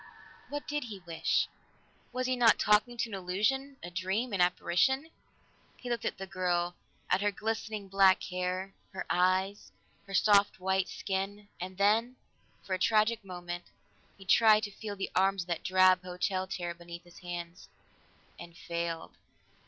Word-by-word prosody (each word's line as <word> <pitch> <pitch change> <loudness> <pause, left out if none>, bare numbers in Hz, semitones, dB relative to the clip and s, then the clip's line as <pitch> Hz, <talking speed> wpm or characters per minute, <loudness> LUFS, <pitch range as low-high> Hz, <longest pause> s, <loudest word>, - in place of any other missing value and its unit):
What 290 0 -4
did 295 -2 -2
he 215 -4 -7
wish? 170 -3 0 0.6
Was 255 +1 -2
he 255 0 +1
not 235 -3 +5
talking 210 +3 +3
to 230 0 -1
an - - -8
illusion, 215 +10 -1
a 175 - -7
dream, 190 +7 -1
an 190 - +1
apparition? 265 - +2 0.7
He 245 - -6
looked 235 -3 -2
at - - -2
the 195 - -5
girl, 180 -2 0 0.3
at 185 - +2
her 205 - +3
glistening 215 -1 -3
black 195 -1 +5
hair, 185 +1 -3 0.2
her 190 - -4
eyes, 185 +3 +1 0.4
her 195 - -4
soft 200 -1 +4
white 190 0 +1
skin, 200 +1 -4
and 185 +1 -6
then, 220 +5 +3 0.5
for 190 - -4
a 185 - 0
tragic 215 +2 +3
moment, 175 -2 -6 0.5
he 195 - -13
tried 215 +1 +6
to 205 - -3
feel 205 0 -6
the 195 - -4
arms 195 0 +3
of 175 - -20
that 170 -1 -1
drab 185 0 +5
hotel 185 +1 -2
chair 180 -3 -3
beneath 170 0 -10
his 175 -1 -16
hands 175 0 -7 0.7
and 170 0 -11
failed. 170 0 -4
190 Hz, 160 wpm, -31 LUFS, 180-215 Hz, 0.7 s, tried